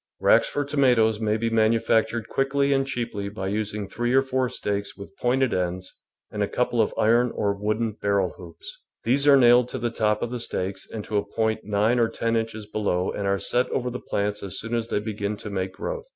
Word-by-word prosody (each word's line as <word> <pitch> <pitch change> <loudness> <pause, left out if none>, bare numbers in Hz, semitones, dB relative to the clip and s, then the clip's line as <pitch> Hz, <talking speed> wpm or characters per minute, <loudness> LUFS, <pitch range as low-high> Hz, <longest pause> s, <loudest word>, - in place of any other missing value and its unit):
Racks - - +4
for 145 - -2
tomatoes 125 -7 +3
may 110 -1 +1
be 115 +1 -1
manufac 110 0 +3
tured 115 -3 -4
quickly 140 +1 +1
and 135 0 +1
cheaply 115 -6 -3
by 95 -2 -4
using 105 0 -3
three 120 +4 -1
or 135 - +5
four 130 -1 0
stakes 100 -2 -3
with 100 -1 -11
pointed 130 0 +1
ends 90 0 -2 0.4
and - - -4
a - - +2
couple - - +1
of - - +1
iron 120 +3 +3
or 100 -1 +1
wooden 110 +3 -1
barrel 100 -3 +1
hoops. 85 -2 -11 0.2
These 135 +5 +2
are 140 -1 +8
nailed 125 -1 +5
to - - -4
the 120 -1 -2
top 105 -2 0
of 120 - -3
the 125 - -3
stakes 95 -4 -3
and 110 -2 -6
to 105 - -1
a 100 - +1
point 110 -1 0
nine 105 +4 +2
or 115 -1 +3
ten 115 0 -1
inches 110 -1 -2
be 105 +1 -5
low 90 -3 0
and 100 - -3
are 100 0 +2
set 120 +5 0
over 125 -1 -2
the 125 - -5
plants 105 +1 -2
as 95 -3 -5
soon 115 +1 -5
as 115 -1 -1
they 105 - 0
begin 105 -1 -3
to 105 - -8
make 95 -1 -3
growth. - - -5
110 Hz, 225 wpm, -25 LUFS, 100-120 Hz, 0.4 s, are